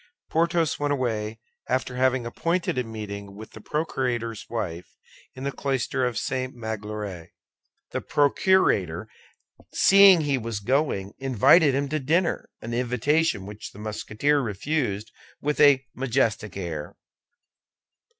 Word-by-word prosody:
Porthos 165 0 +1
went 145 0 0
away 110 -4 -2 0.3
after 130 0 -1
having 130 -1 +1
appointed 165 +9 -1
a - - 0
meeting 100 -3 -7
with 110 +2 -10
the 110 - -12
procurator's 125 -6 -2
wife 90 -7 -5 0.4
in 130 - -8
the 140 - -1
cloister 130 -2 -1
of 120 - -4
St. 130 -1 -2
Magloire. 105 -6 -5 0.6
The - - -2
procurator, 140 - +2 0.7
seeing 195 -3 +7
he 140 -3 0
was 115 -2 -4
going, 110 -4 0
invited 135 - +5
him 140 +1 0
to 155 +1 -1
dinner—an 150 -6 -1
invitation 125 0 +1
which 105 +1 -9
the - - -14
Musketeer 110 +7 0
refused 110 -2 -2 0.3
with 150 +1 -2
a 140 -3 +6
majestic 115 -6 -1
air. 80 -5 -5
125 Hz, 120 wpm, -25 LUFS, 105-145 Hz, 0.7 s, seeing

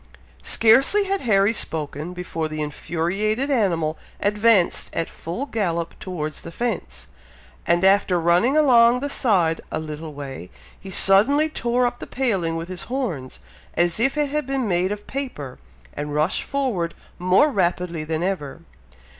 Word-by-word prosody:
Scarcely 265 - +4
had 395 0 -1
Harry 205 -2 +3
spoken, 155 -3 -3
before 170 -3 -4
the 155 0 -6
infuriated 180 - -1
animal 170 - +1 0.2
advanced 210 -2 +2
at 165 - -2
full 175 - -5
gallop 170 -10 -2
towards 155 -5 -5
the 165 - -9
fence, 165 - -4 0.6
and 175 +2 +3
after 195 -2 +4
running 175 - +3
along 245 -4 +5
the 285 0 -3
side 180 - +1
a - - -1
little 155 -1 -6
way, 135 -10 -7 0.3
he 195 - -10
suddenly 225 +12 +4
tore 245 -4 0
up 245 0 -2
the - - -8
paling 195 -11 -1
with 165 +1 -4
his 185 -1 -6
horns, 215 - -4 0.3
as 175 +3 +1
if 270 +5 +1
it 295 -2 0
had 300 -2 -2
been 270 -3 -1
made 180 0 +1
of 205 0 -5
paper, 245 - -6 0.3
and 145 0 -5
rushed 155 +4 +1
forward 240 -12 -2 0.2
more 185 - +4
rapidly 175 - -1
than 160 +1 -2
ever. 170 -5 -3
185 Hz, 150 wpm, -22 LUFS, 165-240 Hz, 0.6 s, along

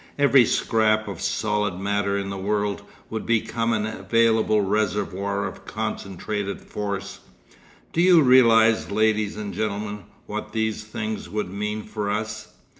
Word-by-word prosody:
Every 140 -3 +6
scrap 110 -1 +2
of 95 -4 -6
solid 105 -3 -1
matter 100 +1 0
in 100 0 -3
the - - -4
world 100 +1 -1 0.3
would 110 - -3
become 115 0 0
an 110 -2 0
available 110 +1 +2
reservoir 100 -1 -1
of - - -7
concentrated 100 +1 -4
force. 100 -1 -5 0.7
Do 165 - +2
you 175 -3 +6
realise, 115 -3 +5
ladies 110 0 +1
and 105 -1 -5
gentlemen, 105 -2 -3 0.2
what - - -6
these 110 -1 -1
things 110 0 -5
would 105 -4 -3
mean 105 +2 -3
for 105 -1 -4
us? 110 +2 -3
105 Hz, 135 wpm, -24 LUFS, 100-110 Hz, 0.7 s, Every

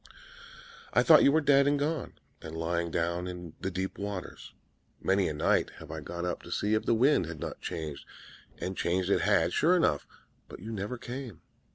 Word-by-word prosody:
'I - - +5
thought 155 -3 +8
you 140 - +6
were 160 +2 +3
dead 140 -1 +5
and 145 0 +3
gone, 150 0 -2 0.3
and 80 +1 -7
lying 85 +1 -1
down 85 +2 -1
in 90 -3 -7
the 95 - -1
deep 95 +1 -4
waters. 100 -3 -6 0.5
Many 95 0 +2
a 75 - -2
night 75 - +2
have 80 -1 -10
I 80 - -5
got 85 +4 -5
up 90 - -3
to - - -11
see 105 +1 0
if 110 - +1
the 115 - +4
wind 120 - +3
had 80 -2 -7
not - - -6
changed: 75 -4 -5 0.5
and 95 +1 -4
changed 90 +2 0
it - - +3
had, - - +2
sure 170 +5 +4
enough; 75 - +1 0.4
but - - -10
you 110 +5 -7
never 105 +3 -4
came. 120 - -7
95 Hz, 200 wpm, -29 LUFS, 85-125 Hz, 0.5 s, thought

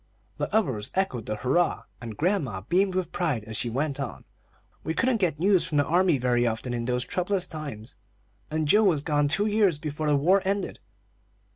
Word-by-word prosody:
The - - -2
others 135 - 0
echoed 160 - -1
the 110 - -2
hurrah, 130 +11 +1 0.2
and 115 -3 -7
grandma 150 - 0
beamed 185 - +1
with 185 -3 -1
pride 150 -11 -1
as 110 +1 -7
she 120 - 0
went 140 +4 -2
on: 135 -4 -5 0.6
"We 160 - -2
couldn't 245 -4 +1
get 170 -5 +1
news 190 0 +4
from 150 - -1
the 145 - +3
army 175 -2 +3
very 120 -1 +1
often 115 +2 -3
in 120 -1 -2
those 125 +1 0
troublous 180 +4 -1
times, 145 -10 -8 0.5
and 155 0 -1
Joe 210 +7 +5
was 160 -7 +2
gone 145 -2 +1
two 195 +8 +1
years 205 -6 +2
before 150 0 -4
the 150 - +3
war 180 +8 +3
ended. 195 +1 -2
150 Hz, 190 wpm, -26 LUFS, 125-185 Hz, 0.6 s, Joe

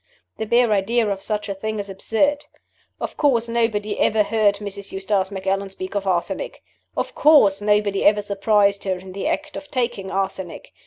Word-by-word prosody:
The 220 - -2
bare 235 0 +3
idea 220 +3 +2
of 200 -1 -2
such 210 +1 -3
a 200 - -2
thing 215 +3 -4
is 200 -1 -4
absurd. 225 +9 0 0.5
Of - - -5
course 240 -6 +2
nobody 220 -3 0
ever 215 -1 +3
heard 210 -1 +2
Mrs. 200 -1 -7
Eustace 190 0 0
Macallan 195 0 -2
speak 185 -1 -7
of 200 -1 -2
arsenic. 185 - -2 0.3
Of - - -2
course 215 -11 +5
nobody 205 -1 +2
ever 210 0 +4
surprised 200 0 +2
her 190 -1 0
in 185 +1 -11
the 195 +1 -3
act 300 0 -2
of 290 - -8
taking 240 -7 -2
arsenic. 190 -2 -4
205 Hz, 175 wpm, -22 LUFS, 195-225 Hz, 0.5 s, course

